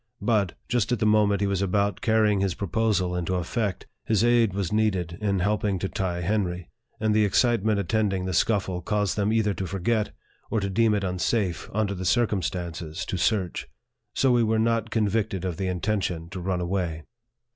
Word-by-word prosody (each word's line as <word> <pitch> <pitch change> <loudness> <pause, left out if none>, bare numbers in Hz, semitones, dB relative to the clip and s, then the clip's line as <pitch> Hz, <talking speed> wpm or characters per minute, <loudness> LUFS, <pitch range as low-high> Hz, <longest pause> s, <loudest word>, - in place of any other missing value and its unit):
But, 105 -6 +1
just 120 -2 0
at 120 - +2
the 110 - 0
moment 105 -2 +3
he - - +2
was 100 -1 0
about 100 +1 0
carry 110 -3 +3
ing 100 - +1
his 95 -3 0
proposal 100 -2 0
into 90 +1 -1
effect, 95 +2 -2 0.2
his 110 -1 +1
aid 120 -3 +4
was 95 -1 -2
needed 95 -6 0
in 100 -2 +1
help 105 +4 0
ing 100 -2 +1
to 95 - -2
tie 90 -2 -2
Henry; 90 -2 -2 0.3
and 110 -1 +1
the 110 0 +4
excitement 110 0 +2
attending 100 -1 0
the 95 - -2
scuffle 95 -2 +1
caused 105 +1 0
them 105 0 +1
either 110 -2 +2
to 95 -1 -4
forget, 105 +5 0 0.4
or 110 - +1
to 100 -1 -2
deem 110 +1 +3
it 100 - -1
unsafe, 90 0 -1
under 105 -1 0
the 95 -1 -5
circumstances, 90 -6 -1
to 95 - -3
search. 95 -2 0 0.5
So 135 - +3
we 120 -1 +4
were 110 0 +2
not 115 0 +1
yet - - -15
convicted 105 -4 0
of 90 -3 -3
the 95 - -2
intention 90 -2 -2
to 95 - -5
run 90 0 -1
away. 85 -3 -2
100 Hz, 195 wpm, -26 LUFS, 90-110 Hz, 0.5 s, aid